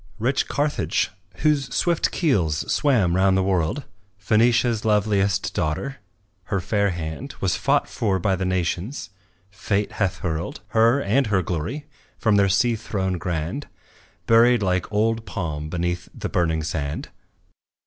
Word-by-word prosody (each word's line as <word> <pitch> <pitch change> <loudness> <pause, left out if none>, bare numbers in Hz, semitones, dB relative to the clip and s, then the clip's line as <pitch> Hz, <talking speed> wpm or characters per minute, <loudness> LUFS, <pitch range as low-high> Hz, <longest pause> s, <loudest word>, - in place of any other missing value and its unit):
Rich 125 +5 0
Carthage, 145 -8 0 0.3
whose 145 -4 +2
swift 170 -2 +1
keels 90 - 0
swam 110 -12 +2
round 95 0 +3
the 95 - +2
world, 95 - 0 0.4
Phœnicia's 115 +2 +2
loveliest 100 -2 +1
daughter. 95 - -2 0.5
Her 100 - -1
fair 100 +2 +1
hand 85 - -5
Was 95 -3 +1
fought - - +1
for 100 -4 0
by 95 +1 +1
the 95 - -3
nations; 95 - -2 0.4
Fate 100 +2 -1
hath 95 -2 -1
hurled, 80 -1 -3
Her 115 +4 +4
and 125 +6 +2
her 100 -3 +1
glory 90 - -3 0.3
from 110 -4 +2
their 100 -1 +4
sea 115 +5 +3
throne 95 -4 -2
grand, 85 - -3 0.6
Buried 115 0 +5
like 90 -2 +1
some 105 - -4
old 115 +1 +1
palm 75 -6 -4
beneath 90 +1 -2
the - - -4
burning 80 -3 0
sand. 75 -1 -3
100 Hz, 140 wpm, -23 LUFS, 90-115 Hz, 0.6 s, Buried